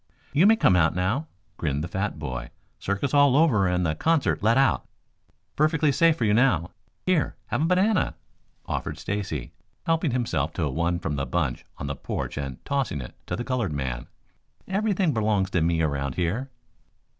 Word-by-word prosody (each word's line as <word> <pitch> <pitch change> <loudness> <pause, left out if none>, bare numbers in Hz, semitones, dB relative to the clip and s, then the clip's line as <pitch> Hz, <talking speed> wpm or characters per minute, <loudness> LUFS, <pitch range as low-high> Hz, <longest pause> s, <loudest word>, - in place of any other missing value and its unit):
"You 170 +7 +5
may 225 - +7
come 95 - +4
out 85 -1 +3
now," 105 - 0 0.3
grinned 75 -2 -1
the - - -3
fat 95 +4 -2
boy. 60 -1 -5 0.3
"Circus 100 +8 -2
all 145 -2 +5
over 120 -12 +4
and 90 0 +1
the 80 - +1
concert 160 - +1
let 115 +4 +3
out. 135 0 +2 0.7
Perfectly 155 0 +3
safe 165 +3 +4
for 115 - 0
you 105 - +3
now. 100 - +3 0.3
Here, 180 -5 +1
have - - 0
a - - +3
banana," 185 +3 +2 0.5
offered - - -3
Stacy, 95 -11 -4 0.3
helping 165 -1 +1
himself 115 - -1
to 80 - -1
one 85 +5 0
from 80 -4 -3
the 70 - -2
bunch - - -1
on - - -5
the 70 0 -3
porch - - -4
and 70 -3 -6
tossing 135 - -1
it - - -8
to - - -2
the 120 - -3
colored 120 -10 -1
man. 65 -4 -3 0.6
"Everything 195 -4 +1
belongs 105 -4 +1
to 85 - +1
me 80 0 +2
around 70 -3 -1
here." 105 +11 -1
105 Hz, 180 wpm, -25 LUFS, -, 0.7 s, may